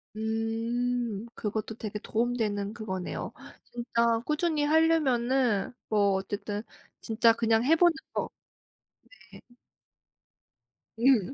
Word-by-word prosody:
음. 225 0 -1
그것도 215 0 -3
되게 215 -2 -5
도움 240 +3 -1
되는 205 -2 -1
그거네요. 190 -6 -5 0.3
진짜 235 -1 0
꾸준히 305 0 0
하려면은 265 -8 +2 0.2
뭐 205 -2 +3
어쨌든 205 +2 -3 0.4
진짜 230 +1 +4
그냥 225 0 +2
해 320 +4 +5
보는 345 0 +5 0.2
거. - - -2 1.0
네. - - -12 1.6
음. 250 -2 +4
230 Hz, 195 characters per minute, -28 LUFS, 215-245 Hz, 1.6 s, 해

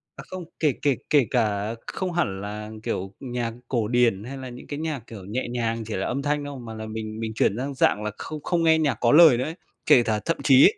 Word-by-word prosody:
À - - -9
không, 185 -2 -6
kể 150 -5 +3
kể 140 -3 +3
kể 140 -6 +4
cả 110 -3 0
không 185 -1 -3
hẳn 95 - 0
là, 105 +1 -6
kiểu, 95 -1 -3
nhạc 120 -3 -3
cổ 115 -5 0
điển 120 -5 +2
hay 135 +4 -7
là 130 -1 -7
những 125 0 -11
cái 145 - -5
nhạc, 155 -3 -2
kiểu, 100 -5 -9
nhẹ 115 +7 -3
nhàng 115 -2 -1
chỉ 110 - -3
là 95 - -1
âm 135 +3 -1
thanh 145 0 0
không, 140 -4 -7
mà 115 - -7
là 110 0 -6
mình 110 0 -5
mình 110 -1 -3
chuyển 105 - +2
sang 135 +3 -3
dạng 105 -5 +2
là 105 - -2
không 155 -2 -7
không 175 -2 +1
nghe 160 -1 +5
nhạc 140 -8 +1
có 120 - +4
lời 155 -4 +8
nữa 125 - 0
ấy. 160 +4 -4 0.3
Kể 130 -6 +6
tả 110 -1 0
thậm 165 - 0
chí 135 -1 +7
ấy, 210 - +4
120 Hz, 260 wpm, -25 LUFS, 110-145 Hz, 0.3 s, lời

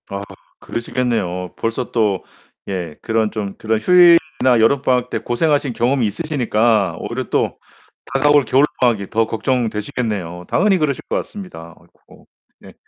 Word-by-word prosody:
아, 100 0 -4 0.4
그러시겠네요. 110 -8 -3
벌써 115 +2 -3
또 105 -5 +1 0.4
예 90 -5 -4
그런 110 -1 0
좀 100 -3 -4
그런 110 0 -1
휴일이나 165 -5 +5
여름 130 +5 +3
방학 125 -2 +1
때 - - -2
고생하신 145 +1 0
경험이 120 +2 +1
있으시니까 110 - +1
오히려 - - -4
또 - - 0 0.6
다가올 145 +1 +4
겨울 135 +3 +3 0.2
방학이 115 -6 +1
더 115 0 +1
걱정되시겠네요. 110 -7 -2
당연히 195 +1 +2
그러실 150 -4 -1
것 - - -2
같습니다. 85 - -7
아이코 - - -22 0.3
네. - - -15
115 Hz, 335 characters per minute, -19 LUFS, 105-135 Hz, 0.6 s, 휴일이나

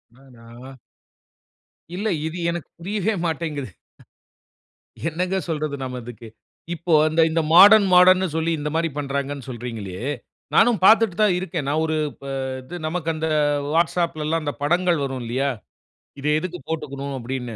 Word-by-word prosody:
அடடா! 125 0 -14 1.2
இல்ல. 205 +4 -2 0.2
இது 160 +2 -6
எனக்கு 170 -1 -5
புரியவே 205 +4 -1
மாட்டேங்குது. 155 -5 -3 1.4
என்னங்க 180 +3 -2
சொல்றது 155 -3 -2
நாம 130 -1 -4
இதுக்கு? 120 -1 -10 0.5
இப்போ 170 +1 -3 0.2
அந்த 160 +1 +1
இந்த 165 +1 +1
மாடர்ன் 200 +3 +9
மாடர்ன் 180 +1 +7
ன்னு 190 - 0
சொல்லி 160 +1 0
இந்த 150 +1 -3
மாரி 165 0 +1
பண்ணுறாங்கன்னு 140 -1 -3
சொல்றீங்களே, 115 -7 -6 0.6
நானும் 230 -2 +4
பார்த்துட்டு 220 -3 +5
தான் 205 -4 +4
இருக்கேன். 180 -5 -4
நான் 155 +3 +1
ஒரு 160 0 -1 0.2
ப - - -13 0.4
இது 150 +8 -9
நமக்கு 165 0 -3
அந்த 160 +1 -2 0.5
வாட்ஸ்அப்லலாம் 165 -1 0
அந்த 145 - -2
படங்கள் 175 +2 +2
வரும் 135 -2 -4
இல்லையா? 130 +4 -1 0.7
இத 140 - -3
எதுக்கு 180 +1 -6
போட்டுக்கணும் 140 -3 -4
அப்படின்னு. 125 -1 -5
155 Hz, 135 wpm, -22 LUFS, 135-175 Hz, 1.4 s, மாடர்ன்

